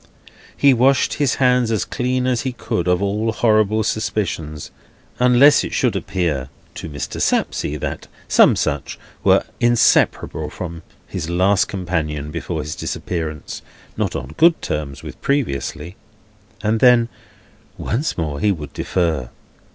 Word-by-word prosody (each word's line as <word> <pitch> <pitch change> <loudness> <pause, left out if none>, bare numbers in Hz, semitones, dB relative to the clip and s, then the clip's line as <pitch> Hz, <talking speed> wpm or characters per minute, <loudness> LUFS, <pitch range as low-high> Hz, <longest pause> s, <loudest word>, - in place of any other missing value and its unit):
He 140 -1 +5
washed 130 +3 +3
his 145 -3 +1
hands 125 -2 +3
as 110 -3 0
clean 125 +1 -1
as 125 -2 +1
he 130 -2 -3
could 90 -6 -3
of 90 +2 +2
all 105 +3 0
horrible 110 -1 +2
suspicions, 85 -9 -3 0.5
unless 125 +4 +6
it - - -5
should - - +1
appear 75 -8 -2 0.2
to - - -7
Mr. 70 -1 -5
Sapsea 75 - 0
that - - -5 0.2
some - - +5
such - - -2 0.3
were - - +4 0.2
inseparable 115 -9 +2
from 85 0 -7 0.2
his 80 - -5
last 95 +3 +3
companion 80 -6 -3
before 80 0 -4
his 75 0 -5
disappearance 80 -4 -4 0.3
(not - - -2
on 65 +4 -5
good 170 0 +5
terms 70 -2 -4
with - - -10
previously), 90 - -2 0.7
and 110 +1 +1
then, 120 -1 +5 0.7
once 135 +9 -2
more, 75 -4 -3
he 105 - +2
would 75 -6 -5
defer. 80 -9 -1
95 Hz, 135 wpm, -20 LUFS, 75-120 Hz, 0.7 s, unless